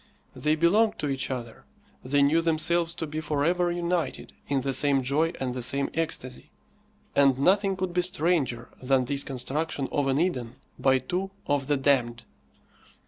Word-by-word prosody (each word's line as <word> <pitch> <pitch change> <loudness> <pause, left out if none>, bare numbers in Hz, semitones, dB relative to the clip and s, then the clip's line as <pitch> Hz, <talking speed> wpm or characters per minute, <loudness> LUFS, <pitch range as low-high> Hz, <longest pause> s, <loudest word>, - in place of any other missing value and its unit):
They 150 +1 +1
belonged 200 +8 +3
to 145 - -2
each 135 -1 -2
other; 120 -3 -6 0.4
they 140 +2 +2
knew 155 +4 +3
themselves 165 +1 +1
to 165 - -4
be 155 +1 -5
for 150 -2 -1
ever 175 +1 +2
united 175 -4 -2
in 140 -2 0
the 135 +1 -1
same 140 -1 +3
joy 150 +6 +1
and 130 -2 -2
the 125 - -4
same 140 +3 +1
ecstasy; 155 -6 -4 0.7
and 135 -2 +4
nothing 195 +7 +2
could 185 -1 -3
be 180 - +2
stranger 160 -9 -1
than 130 0 +2
this 140 +1 +1
construction 135 +2 -2
of 145 -2 0
an 135 +1 +1
Eden 130 -9 -1 0.2
by 130 -1 +4
two 180 +9 -3 0.2
of 145 -2 0
the 145 -1 +2
damned. 125 -4 +1
145 Hz, 170 wpm, -26 LUFS, 135-170 Hz, 0.7 s, and